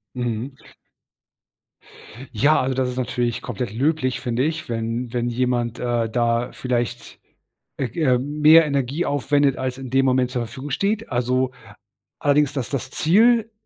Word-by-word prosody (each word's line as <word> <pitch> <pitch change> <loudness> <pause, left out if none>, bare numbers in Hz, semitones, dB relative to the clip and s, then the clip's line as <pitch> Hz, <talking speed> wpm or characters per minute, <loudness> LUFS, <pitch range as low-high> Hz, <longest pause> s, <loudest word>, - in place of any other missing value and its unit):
Mhm. 120 +2 -3 1.8
Ja, 145 +8 +3
also 130 +1 -1
das 130 -1 0
ist 125 - -6
natürlich 120 -2 -1
komplett 120 -2 -4
löblich, 130 0 0
finde 125 0 -1
ich, 160 -1 -3
wenn 115 +1 -3
wenn 120 0 -1
jemand, 120 -1 -1
äh, 120 -2 -1
da 120 +1 0
vielleicht, 120 -3 -3 0.6
äh, 135 - -1
ähm, 140 +1 +1
mehr 160 +2 +8
Energie 140 +3 -1
aufwendet, 145 0 +1
als 130 0 -3
in 130 -2 -7
dem 135 +1 +2
Moment 125 -1 +2
zur 120 -2 -2
Verfügung 130 +5 -8
steht. 205 - -1
Also 125 +1 0 0.7
allerdings, 145 0 +2
das 135 -5 -3
das 130 -1 -4
Ziel, 225 +8 +3
130 Hz, 145 wpm, -22 LUFS, 120-145 Hz, 1.8 s, mehr